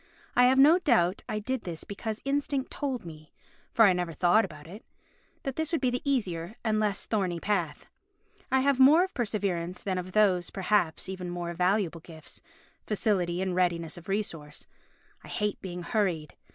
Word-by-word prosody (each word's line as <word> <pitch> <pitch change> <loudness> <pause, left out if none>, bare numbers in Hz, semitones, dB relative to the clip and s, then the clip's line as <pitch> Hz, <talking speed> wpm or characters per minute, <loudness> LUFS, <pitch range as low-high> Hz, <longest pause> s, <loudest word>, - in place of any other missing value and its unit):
I 245 - +6
have 260 +1 +4
no 305 +6 +7
doubt 205 - +2
I 215 - -1
did 250 +4 -2
this 170 -3 -6
because 215 +2 -5
instinct 280 -1 -1
told 265 -8 -3
me 155 -2 -11 0.4
(for 225 - +6
I 195 - +6
never 175 -2 -2
thought 175 +7 +4
about 155 -6 -8
it) 195 +7 -11 0.6
that 270 -2 -4
this 320 0 -1
would 330 - +1
be 255 -2 +1
the 245 - -2
easier 200 - -1
and 215 -2 +1
less 210 -2 0
thorny 185 -6 -1
path. 175 -6 -1 0.7
I 265 0 +4
have 275 -1 +2
more 295 +7 +7
of 380 - -4
perseverance 190 -7 -2
than 190 -2 -1
of 180 0 -7
those, 190 -5 +3
perhaps, 190 -4 0
even 185 -1 -5
more 175 -1 -4
valuable 180 -1 0
gifts—facility 175 +3 -3
and 190 -1 -1
readiness 170 -3 0
of 175 +3 -12
resource. 165 -7 -4 0.6
I - - -12
hate 210 -2 -2
being 180 -2 -6
hurried. 170 -7 -1
195 Hz, 175 wpm, -28 LUFS, 175-235 Hz, 0.7 s, no